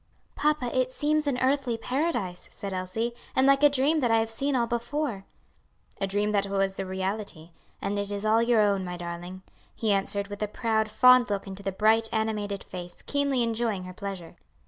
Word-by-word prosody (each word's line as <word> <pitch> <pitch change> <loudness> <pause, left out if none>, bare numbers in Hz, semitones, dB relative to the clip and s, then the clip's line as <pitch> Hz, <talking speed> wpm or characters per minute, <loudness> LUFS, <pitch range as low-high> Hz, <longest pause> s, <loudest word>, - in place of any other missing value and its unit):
"Papa, 295 -5 0
it 255 0 +1
seems 300 +2 0
an 270 -3 +1
earthly 260 -3 +1
paradise," 250 - -2
said 200 -1 -6
Elsie, 185 +6 -2 0.2
"and 260 - +4
like 275 0 +5
a 295 - +7
dream 285 +3 +2
that 245 -4 +1
I 225 - +4
have 225 0 0
seen 275 +5 -1
all 240 -2 +2
before." 235 -2 -2 0.7
"A 195 - 0
dream 205 +2 0
that 200 -1 +1
was 195 -1 -1
a 195 - -3
reality. 190 -3 -4 0.3
And 205 +1 -1
it 200 0 -2
is 205 +1 -3
all 220 +1 +4
your 235 -2 +4
own, 200 -2 +2
my 180 -1 -5
darling," 175 +2 -7 0.3
he 220 -2 0
answered 200 +1 -1
with 205 0 -7
a 210 - 0
proud, 220 0 0
fond 250 +2 +6
look 200 -1 -2
into 195 0 -8
the 195 0 -2
bright 220 +3 +3
animated 215 -3 -2
face, 175 -1 -9
keenly 280 -3 +1
enjoying 225 -4 -1
her 185 0 -8
pleasure. 195 -3 -7
215 Hz, 195 wpm, -27 LUFS, 195-250 Hz, 0.7 s, a